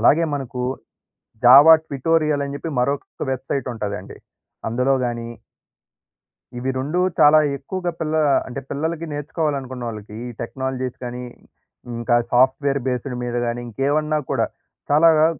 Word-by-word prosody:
అలాగే 155 +8 +5
మనకు 130 -3 -4 0.8
Java 140 +6 +10
tutorial 150 +1 +1
అని 140 - -6
జెప్పి 165 - -5
మరొక 140 +9 -2
వెబ్‌సైట్ 135 0 -3
ఉంటదండి. 100 -3 -5 0.5
అందులోగాని... 120 -1 0 1.3
ఇవి 125 +2 -2
2 145 +7 -2 0.2
చాలా 150 0 +8 0.2
ఎక్కువగా 175 +6 -4
పిల్ల 155 -1 -1 0.3
అంటే 130 +2 -5
పిల్లలకి 160 +3 -2
నేర్చుకోవాలనుకున్నోళ్ళకి, 130 -8 -4
ఈ - - -6
టెక్నాలజీస్ 130 +1 -4
గానీ, 125 0 -5 0.7
ఇంకా 120 +1 0 0.2
సాఫ్ట్ 130 +3 +4
వేర్ 140 0 +1
బేస్డ్ 125 0 -2
మీద 120 0 -3
గాని, 120 +1 -2
ఇంకేవన్నా 150 +6 0
కూడా - - +1 0.4
చాలాగా 155 +1 +6
135 Hz, 115 wpm, -21 LUFS, 125-150 Hz, 1.3 s, Java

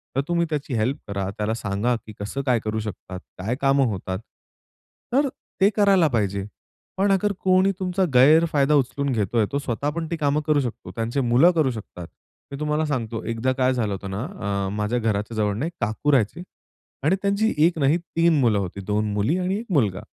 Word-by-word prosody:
तर 135 - +2
तुम्ही 170 -1 +1
त्याची 145 -3 -3
हेल्प 125 +6 0
करा, 100 -1 -3
त्याला 105 +1 -1
सांगा, 110 +2 -1
की 110 -1 -10
कसं 105 +7 -3
काय 125 -3 +3
करू 110 0 -2
शकतात, 95 -3 -7 0.2
काय 105 +7 -2
कामं 135 0 +3
होतात. 95 -1 -4 0.9
तर 280 +3 +4
अ, 275 - -1 0.3
ते 195 - +6
करायला 195 -5 +4
पाहिजे. 100 -6 -1 0.5
पण 195 +1 +2
अगर 200 +2 +2
कोणी 185 +1 +3
तुमचा 185 +1 0
गैरफायदा 150 +2 +5
उचलून 140 +1 0
घेतोय, 110 -1 +1
तो 140 - 0
स्वतः 140 +1 -2
पण 165 -1 -3
ती 170 - 0
कामं 150 0 +1
करू 150 -2 +3
शकतो, 120 -4 -6
त्यांची 115 +4 -2
मुलं 125 +8 +5
करू 155 -6 +1
शकतात. 95 -6 -8 0.4
मी 140 - -6
तुम्हाला 150 +1 0
सांगतो, 115 -6 -3
एकदा 115 +3 -1
काय 130 0 +2
झालं 110 -5 -1
होतं 95 0 -6
ना, 95 +2 -3 0.2
आह 100 -1 -1
माझ्या 105 +4 0
घराच्या 110 0 -1
जवळून 105 +2 0
एक 165 - -2
काकू 110 +8 0
राहायचे. 130 +3 +1 0.6
आणि 160 +7 +3
त्यांची 200 +3 +1
1 170 -2 +1
नाही, 140 +4 +3
3 170 -2 +1
मुलं 115 -5 +3
होती. 95 +1 -5
2 105 0 0
मुली 105 - +1
आणि 185 +2 -1
1 235 - -7
मुलगा. 105 -8 +1
130 Hz, 195 wpm, -23 LUFS, 105-160 Hz, 0.9 s, ते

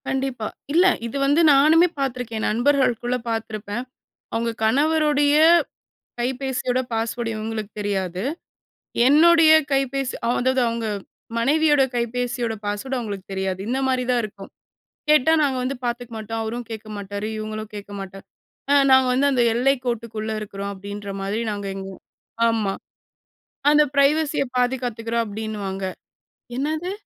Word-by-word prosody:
கண்டிப்பா. 265 -5 -2 0.3
இல்ல. 350 +3 +5 0.2
இது 235 - -5
வந்து 290 +4 +4
நானுமே 315 +5 +6
பார்த்துருக்கேன். 245 -4 -2
நண்பர்களுக்குள்ள 250 0 +1
பார்த்துருப்பேன். 220 0 -4 0.5
அவுங்க 230 +1 0
கணவருடைய 290 +3 +3 0.9
கைபேசியோட 255 0 -1
பாஸ்வேர்ட் 230 +1 -2
இவுங்களுக்கு 215 -1 -4
தெரியாது. 190 -3 -2 0.8
என்னுடைய 320 +3 +6 0.2
கைபேசி, 270 -1 0
அ, - - +1
அதாவது 260 +1 +2
அவுங்க 230 -1 -3 0.5
மனைவியோட 295 +3 +3
கைபேசியோட 240 0 -1
பாஸ்வேர்ட் 205 +6 -3
அவுங்களுக்கு 205 -5 -5
தெரியாது. 190 -1 -2
இந்த 255 +2 0
மாரி 255 -1 +1
தா 250 - +3
இருக்கும். 200 -2 -9 0.6
கேட்டா 305 +1 +5
நாங்க 275 -3 +1
வந்து 265 +2 -2
பாத்துக்க 240 0 -3
மாட்டோம். 225 +1 -4
அவரு 220 +2 -4
கேக்க 220 -1 -7
மாட்டாரு. 200 +1 -5
இவுங்களும் 215 0 -5
கேக்க 205 0 -8
மாட்டேன். 195 0 -9 0.5
அ, - - +6 0.2
நாங்க 260 -1 +6
வந்து 270 +3 +3
அந்த 250 -3 +3
எல்லை 255 +4 +3
கோட்டுக்குள்ள 225 -2 -3
இருக்கிறோம் 200 -1 -5
அப்டின்ற 200 +1 -7
மாரி 200 +3 -2
நாங்க 205 -1 -4
எங்க, 195 0 -6
உ, - - -16 0.5
ஆமா. 220 -4 0 1.0
அந்த 300 0 +6
பிரைவசிய 295 +2 +3
பாதுகாத்துக்கிறோம் 240 -2 -1
அப்டின்னுவாங்க. 205 -2 -4 0.7
என்னது? 315 +6 -2
235 Hz, 125 wpm, -23 LUFS, 215-270 Hz, 1.0 s, நானுமே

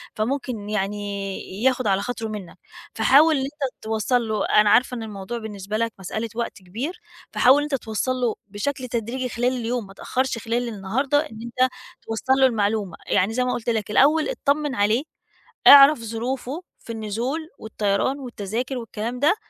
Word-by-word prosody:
فممكن 230 -2 -2
يعني 200 0 -3
ياخد 255 -2 +2
على 195 -1 +2
خاطره 230 +1 -4
منك. 210 -5 -7 0.4
فحاول 290 +8 +5
إن 270 - 0
أنت 275 -1 -5
توصّل 220 +2 0
له، 215 -2 0
أنا 210 0 +4
عارفة 250 +4 +4
إن 225 - -5
الموضوع 205 +1 -6
بالنسبة 210 -2 -5
لك 230 0 -1
مسألة 220 +4 -4
وقت 235 - -3
كبير، 230 - -5 0.3
فحاول 270 +4 +5
أنت 295 -1 -1
توصّل 225 0 -2
له 245 -3 0
بشكل 255 +6 -3
تدريجي 240 +2 -3
خلال 245 +2 0
اليوم، 235 -2 -2
ما 195 - -13
تأخّرش 260 +5 -2
خلال 230 +2 -2
النهاردة 235 +7 0
إن 225 -8 -5
أنت 255 +2 +1 0.3
توصّل 225 +4 0
له 265 - +6
المعلومة، 210 -5 0
يعني 195 +4 +2
زي 250 +2 +1
ما 250 - 0
قُلت 240 0 -3
لك 220 -3 -1
الأول 300 - +4
اتطمّن 295 - 0
عليه، 215 +6 +2 0.6
اعرف 280 -1 +10
ظروفه 250 +7 -4 0.2
في 230 - -9
النزول 235 +9 -3
والطيران 220 +5 -1
والتذاكر 245 +1 -4
والكلام 230 +1 -5
ده، 300 +8 +4
230 Hz, 165 wpm, -23 LUFS, 210-260 Hz, 0.6 s, اعرف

